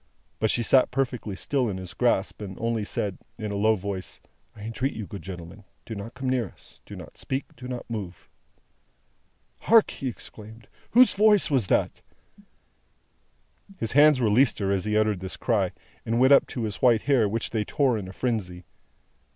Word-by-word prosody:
But 110 - +1
she 120 - +1
sat 130 +3 +4
perfectly 125 -6 -2
still 125 - 0
in 95 - -4
his 90 -2 -7
grasp, 110 -5 0
and 95 -3 -7
only 115 -1 -1
said, 100 -2 -3 0.2
in 110 -2 -4
a - - -3
low 110 +2 +3
voice, 100 -1 -5 0.4
"I - - -12
entreat 115 +5 -2
you, 110 - -5
good 100 -4 -8
gentlemen, 90 +3 -9 0.2
do 115 - -6
not 105 +3 -7
come 130 0 -4
near 125 -4 +1
us, - - -17
do - - -9
not - - -11
speak, 135 +1 -4
do 125 +1 -9
not 125 -1 -6
move!" 100 -6 -6 1.3
"Hark!" 225 -1 +5
he 135 - -5
exclaimed. 110 -2 -9 0.3
"Whose 250 +2 +6
voice 210 -4 +4
was 125 -8 +2
that?" - - 0 1.8
His 115 - -2
hands 145 0 +6
released 120 +2 +3
her 100 -1 -1
as 95 -1 0
he 105 0 +1
uttered 110 -3 +1
this 95 0 -6
cry, 100 -7 0 0.3
and 115 +1 -1
went 130 +2 +6
up - - +5
to 120 - -4
his 105 -2 -3
white 120 -4 +4
hair, 125 -7 +3
which 115 +2 -2
they 110 -2 0
tore 135 +2 +1
in 100 -4 -4
a - - -8
frenzy. 100 -8 -3
110 Hz, 185 wpm, -26 LUFS, 100-125 Hz, 1.8 s, Whose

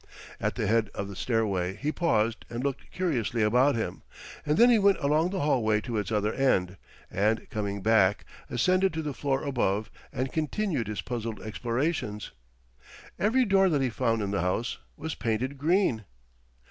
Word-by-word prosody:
At - - -1
the - - -1
head 110 +1 +2
of 100 0 -4
the 100 - -8
stairway 100 -6 0
he 145 +8 -2
paused 115 -10 +1
and 120 +2 -4
looked 140 -1 -3
curiously 125 - 0
about 125 +6 +4
him. 115 - -3 0.5
And 150 +1 +2
then 240 +1 +7
he 230 - +5
went 200 -1 +4
along 155 +4 +2
the 190 0 -2
hallway 115 -7 +2
to 115 -1 -2
its 105 0 -4
other 105 0 +1
end; 95 -9 +1 0.3
and, 105 +4 +1
coming 100 -2 -3
back, 105 -3 +3 0.2
ascended 185 +9 +2
to 160 0 -3
the 150 -2 -3
floor 135 0 -1
above 110 -7 -1 0.2
and 130 +1 -3
continued 160 - -1
his 105 -3 -3
puzzled 115 -2 -4
explorations. 115 0 -2 0.9
Every 230 +7 +3
door 195 -2 +4
that 145 -5 +1
he 130 - 0
found 115 -2 0
in 100 - -2
the 100 - 0
house 90 +7 -1 0.2
was 160 +1 -4
painted 120 +5 -2
green. 155 - +2
120 Hz, 170 wpm, -28 LUFS, 105-150 Hz, 0.9 s, then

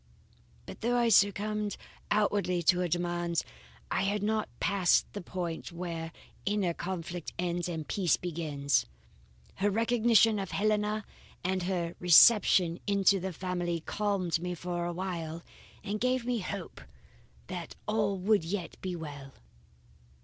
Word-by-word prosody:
"But - - -10
though 240 +2 +1
I 240 -1 +3
succumbed 210 0 +2 0.3
outwardly 200 -4 +1
to 175 +2 +4
her 180 - +1
demands, 175 0 -1 0.5
I - - +1
had 200 +1 0
not 215 0 0
passed 195 -3 +3
the 205 - -5
point 175 -2 -5
where 170 -1 -5 0.3
inner 200 -4 0
conflict 175 -1 -5
ends 175 0 -1
and 160 -3 -4
peace 185 -5 +2
begins. 150 - -1 0.7
Her 205 - +2
recognition 225 0 +3
of 195 -2 -4
Helena 210 0 0 0.4
and 185 +1 0
her 175 -2 -2
reception 180 -1 +6
into 200 -1 +4
the 190 +1 -3
family 175 -1 -2
calmed 195 -3 -1
me 180 +1 -3
for 175 0 -3
a - - -2
while, 170 -2 -4 0.4
and 210 +1 -3
gave 255 0 +1
me 245 -1 0
hope 195 -2 -6 0.6
that 175 -2 -6
all 210 -2 +1
would 200 0 +2
yet 175 +1 -4
be 185 -1 -3
well. 145 -4 -8
185 Hz, 135 wpm, -30 LUFS, 170-205 Hz, 0.7 s, reception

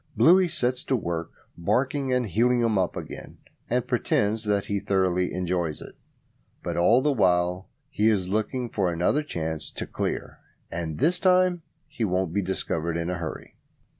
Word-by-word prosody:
Bluey 180 +3 +6
sets 125 -5 -1
to 130 - +1
work 85 -7 -3 0.3
barking 130 - 0
and 125 -1 +2
heeling 120 +5 +2
'em 115 -2 +2
up 95 -2 0
again, - - -8 0.3
and - - +1
pretends 110 +2 0
that 100 -1 +1
he 100 -1 -1
thoroughly 90 -2 +1
enjoys 90 -3 -1
it; - - -11 0.7
but - - -3
all 120 +9 +4
the 150 -1 +3
while 90 -4 +1 0.2
he 110 -7 +2
is 95 -4 +1
looking 110 +5 -1
out 120 - -10
for 95 -4 +1
another 90 - +1
chance 80 - -4
to - - -5
"clear". - - -4 0.3
And 85 -2 -4
this 175 +4 +2
time 185 -1 +3 0.3
he 150 -6 -4
won't 90 -4 0
be 100 - +1
discovered 85 -3 -2
in 85 +1 -2
a 90 - -3
hurry. 80 -2 -7
100 Hz, 170 wpm, -26 LUFS, 90-125 Hz, 0.7 s, Bluey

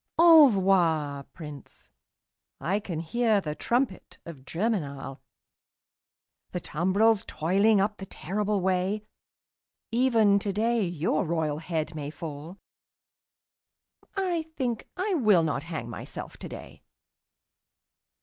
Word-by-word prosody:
Envoi 190 - +5
Prince, 150 -4 -11 0.7
I 195 +4 0
can 170 -6 -5
hear 220 +5 +2
the 155 -6 -4
trumpet 235 - -2
of 145 -6 -10
Germinal, 150 - -3 1.3
The 180 - -1
tumbrils 195 +7 +2
toiling 200 +6 +2
up 205 +2 0
the 195 - -8
terrible 205 +4 -2
way; 190 +3 0 0.9
Even 225 -4 +4
today 215 +3 0
your 170 +1 0
royal 160 -3 -1
head 160 -1 -3
may 145 -2 -5
fall 155 +3 -8 1.6
I 355 -5 -1
think 245 -5 -2
I 385 +2 0
will 215 - +4
not 155 -3 -1
hang 160 -6 -6
myself 115 - -8
today. - - -10
190 Hz, 100 wpm, -27 LUFS, 160-220 Hz, 1.6 s, Envoi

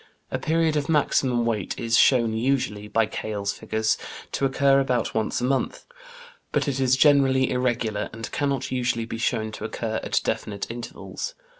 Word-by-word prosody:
A - - -1
period 160 -1 +1
of 145 0 -1
maximum 130 -5 +2
weight 110 -5 -2
is 115 0 +1
shown 115 -3 +4
usually, 110 -3 -1
by 110 +2 +2
Keill's 105 -1 -3
figures, 110 0 -1 0.3
to 140 - 0
occur 135 +1 +4
about 125 -3 0
once 110 +2 -1
a - - -2
month, 130 +1 -1 0.7
but - - 0
it 135 -2 -1
is 130 -1 +3
generally 135 -3 +4
irregular, 120 -4 -1
and 115 0 -7
cannot 140 -3 -1
usually 120 -2 0
be 115 0 -6
shown 110 -2 0
to 105 - -8
occur 110 0 -3
at - - +1
definite 100 +1 -3
intervals. 120 - -6
120 Hz, 165 wpm, -25 LUFS, 110-135 Hz, 0.7 s, shown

